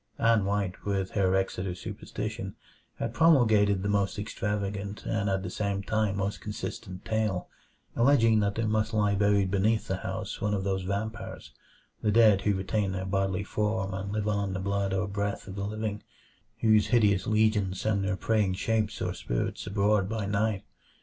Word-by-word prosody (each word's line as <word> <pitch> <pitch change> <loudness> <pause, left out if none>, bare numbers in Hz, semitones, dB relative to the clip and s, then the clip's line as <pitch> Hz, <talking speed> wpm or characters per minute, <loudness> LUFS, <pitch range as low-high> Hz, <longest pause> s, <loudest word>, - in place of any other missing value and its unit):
Ann 115 -3 +3
White, 100 -2 -1
with 95 -2 -1
her 95 -2 +2
Exeter 95 -1 -1
superstition, - - -5 0.4
had 115 - -3
promulgated 110 - +4
the - - -1
most 100 -1 +1
extravagant 100 0 -3
and 105 -2 0
at 95 -1 0
the 90 - -4
same 100 -1 -2
time 110 -1 0
most 100 +1 -2
consistent 100 -2 -6
tale; 110 -5 -1 0.5
alleging 115 -3 +4
that 100 -1 0
there 115 - 0
must 110 0 0
lie 105 -1 +3
buried 100 -1 +2
beneath 105 +3 +1
the 95 - -1
house - - -5
one 105 0 +1
of 95 - -2
those 95 -1 0
vampires 100 +4 -4 0.5
the 105 - +1
dead 105 -3 +6
who 100 0 +1
retain 95 +1 -1
their 95 0 -3
bodily 95 0 0
form 105 -1 -1
and 95 +1 -4
live 105 0 -1
on 100 -2 0
the 95 - -2
blood 100 0 -1
or 95 +1 0
breath 100 +1 -3
of 95 - -6
the 100 0 -3
living 105 -1 -3 0.6
whose 110 -2 +4
hideous 105 -5 +3
legions 105 -3 +2
send 105 -2 +1
their 95 -1 -1
preying 105 -4 +1
shapes 110 +2 -1
or - - -1
spirits - - -3
abroad 100 0 +2
by 110 -2 -2
night. 100 0 0
100 Hz, 175 wpm, -28 LUFS, 95-110 Hz, 0.6 s, dead